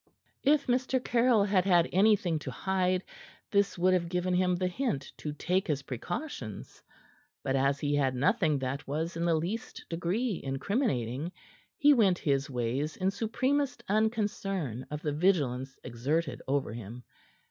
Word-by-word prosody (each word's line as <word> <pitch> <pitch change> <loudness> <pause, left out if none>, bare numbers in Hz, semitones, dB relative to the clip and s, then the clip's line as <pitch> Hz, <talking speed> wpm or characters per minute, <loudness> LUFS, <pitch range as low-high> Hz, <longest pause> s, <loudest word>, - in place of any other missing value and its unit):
If 290 +1 +3
Mr. 255 +1 +1
Caryll 240 -3 +3
had 195 -2 +2
had 175 -3 +4
anything 190 -4 +3
to 145 - -6
hide, 185 +5 0 0.5
this 200 -2 +2
would 185 +1 +3
have 170 -2 +1
given 180 +1 0
him 180 0 +2
the 185 +1 -1
hint 180 - -2
to 150 - -4
take 180 +6 0
his 145 -4 -1
precautions; 135 - -6 0.6
but 135 - 0
as 135 +1 +2
he 145 0 0
had 135 -3 +2
nothing 150 - +2
that 135 +2 -4
was 160 +5 -2
in 170 +1 -1
the 170 -1 +3
least 180 +9 -4
degree 180 +6 -1
in 135 0 -2
incriminating, 140 - -1 0.5
he 290 0 +6
went 200 -8 +4
his 140 -3 0
ways 130 +4 -2
in 190 +1 +1
supremest 250 +5 -1
unconcern 195 - -1
of 150 +1 -5
the 150 -2 -1
vigilance 140 -6 +1
exerted 135 +7 -2
over 135 -3 0
him. 115 +2 -8
175 Hz, 155 wpm, -30 LUFS, 140-200 Hz, 0.6 s, he